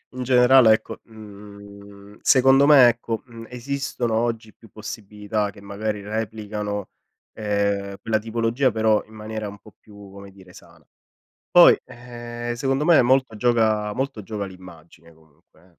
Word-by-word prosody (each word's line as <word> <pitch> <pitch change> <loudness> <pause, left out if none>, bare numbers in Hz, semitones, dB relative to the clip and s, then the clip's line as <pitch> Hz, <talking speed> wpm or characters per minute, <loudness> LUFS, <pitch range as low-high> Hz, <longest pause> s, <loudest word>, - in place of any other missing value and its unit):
in 130 - -4
generale 125 -2 +5
ecco, - - -4
mhmm, 100 -1 -14
secondo 135 +2 +4
me 135 -5 +8
ecco, 115 -1 -2
mhmm, 115 -2 -12
esistono 125 -1 -4
oggi 115 -2 -2
più 115 - -20
possibilità 105 0 -5
che 100 0 -14
magari 105 +1 -5
replicano, 105 -1 -5 0.5
ehm, 100 -2 -2
quella 110 -1 0
tipologia 115 +4 -1
però 110 -1 +1
in 110 - -19
maniera 110 0 -6
un 100 - -11
po' 110 - -18
più 100 -2 -15
come 100 0 -12
dire 95 -2 -18
sana. 85 -2 -18 0.7
Poi, - - +7
ehm, 120 0 -8
secondo 135 +3 -1
me 165 -5 +5
molto 130 -2 +1
gioca 110 -2 +1
molto 135 -2 -4
gioca 105 0 -5
l'immagine 85 -3 -15
comunque 80 0 -27
eh. 90 - -24
110 Hz, 145 wpm, -22 LUFS, 100-120 Hz, 0.7 s, me